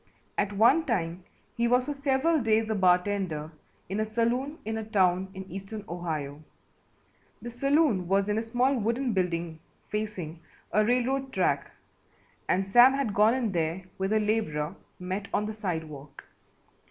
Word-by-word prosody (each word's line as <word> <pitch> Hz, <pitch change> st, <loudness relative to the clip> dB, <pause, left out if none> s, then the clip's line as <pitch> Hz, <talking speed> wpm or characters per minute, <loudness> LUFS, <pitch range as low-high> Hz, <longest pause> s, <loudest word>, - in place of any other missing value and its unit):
At 205 Hz, 0 st, 0 dB
one 240 Hz, +11 st, +4 dB
time 180 Hz, -, -2 dB, 0.3 s
he 235 Hz, 0 st, +1 dB
was 250 Hz, +1 st, +3 dB
for 295 Hz, -, -2 dB
several 280 Hz, +3 st, +1 dB
days 220 Hz, -1 st, +2 dB
a -, -, +2 dB
bartender 180 Hz, -4 st, +1 dB, 0.4 s
in 195 Hz, +3 st, -3 dB
a -, -, +2 dB
saloon 240 Hz, +7 st, -1 dB
in 220 Hz, +1 st, -2 dB
a -, -, -4 dB
town 190 Hz, -4 st, +2 dB
in 190 Hz, -, -6 dB
eastern 195 Hz, +3 st, -7 dB
Ohio. 155 Hz, -4 st, -4 dB, 1.0 s
The 240 Hz, -, -7 dB
saloon 275 Hz, -, +2 dB
was 195 Hz, +2 st, +2 dB
in 210 Hz, +1 st, +1 dB
a -, -, -1 dB
small 245 Hz, +4 st, +1 dB
wooden 235 Hz, +3 st, 0 dB
building 170 Hz, -3 st, -1 dB, 0.3 s
facing 200 Hz, -7 st, -4 dB, 0.3 s
a 215 Hz, -, +3 dB
railroad 255 Hz, +3 st, 0 dB
track -, -, 0 dB, 0.8 s
and 190 Hz, +1 st, +1 dB
Sam 245 Hz, +6 st, +7 dB
had 270 Hz, -7 st, -1 dB
gone 215 Hz, +4 st, +4 dB
in 240 Hz, -5 st, -1 dB
there 170 Hz, +1 st, -1 dB, 0.2 s
with 190 Hz, +1 st, -1 dB
a 220 Hz, -, +3 dB
labourer 200 Hz, -7 st, -1 dB, 0.2 s
met 185 Hz, +2 st, -4 dB
on 210 Hz, -, +1 dB
the 215 Hz, -, -4 dB
sidewalk. 160 Hz, -9 st, -6 dB
210 Hz, 155 wpm, -28 LUFS, 180-235 Hz, 1.0 s, Sam